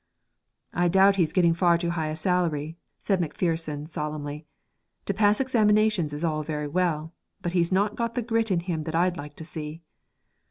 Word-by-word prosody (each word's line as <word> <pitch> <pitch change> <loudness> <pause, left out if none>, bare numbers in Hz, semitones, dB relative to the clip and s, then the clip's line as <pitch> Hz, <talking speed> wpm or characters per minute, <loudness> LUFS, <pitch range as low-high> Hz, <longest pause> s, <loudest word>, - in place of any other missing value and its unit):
'I 175 +1 +2
doubt 195 +3 +5
he's 165 -4 +2
getting 170 -3 +3
far 170 0 +3
too 170 0 -1
high 160 -2 -2
a 155 - -3
salary,' 160 -3 0 0.2
said 195 -3 0
Macpherson 160 -2 -2
solemnly. 150 -1 -5 0.6
'To 200 - 0
pass 205 +1 +3
examinations 215 - +2
is 145 +2 -5
all 155 -2 0
very 150 -1 -3
well; 160 0 -1 0.3
but 175 - -1
he's 175 -1 +1
not 200 +3 +2
got 235 -1 -2
the 245 - -1
grit 225 -1 0
in 180 -3 +1
him 165 -3 -3
that 160 - -3
I'd 175 +1 +2
like 145 0 -8
to 160 - -9
see.' 155 0 -7
170 Hz, 185 wpm, -26 LUFS, 155-190 Hz, 0.6 s, doubt